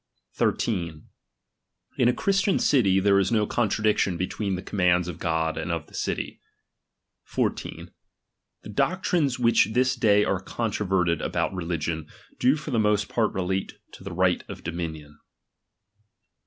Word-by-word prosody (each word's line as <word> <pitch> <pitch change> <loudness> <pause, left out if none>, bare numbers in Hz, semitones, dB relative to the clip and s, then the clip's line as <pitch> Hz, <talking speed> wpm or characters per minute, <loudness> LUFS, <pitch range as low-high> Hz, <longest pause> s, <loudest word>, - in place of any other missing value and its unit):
13 85 -8 -1 0.9
In 125 - +5
a - - +5
Christian 195 +7 +1
city, 100 -9 +3
there 100 0 +4
is 95 +2 +1
no 110 -2 +3
con 115 0 0
tradiction 105 -4 +1
between 95 +2 -2
the 90 - -6
commands 90 -3 +2
of 85 -3 -6
God 80 -1 -1
and 80 +2 -3
of 85 -3 -2
the - - -22
city. - - -3 1.0
H< - - 0 1.0
The - - -9
doctrines 170 - +1
which 115 -5 +4
this 130 +2 +2
day 105 -4 +4
are 95 - 0
controverted 95 -6 0
about - - -1
reli 85 -2 -2
gion, 80 0 -4 0.3
do 130 +3 +4
for 150 -1 -6
the 115 - +1
most 105 -1 +2
part 115 -3 +1
relate 95 +1 -2 0.2
to - - -13
the - - -6
right - - +1
of - - -8
dominion. 80 -3 -6
100 Hz, 150 wpm, -25 LUFS, 85-115 Hz, 1.0 s, In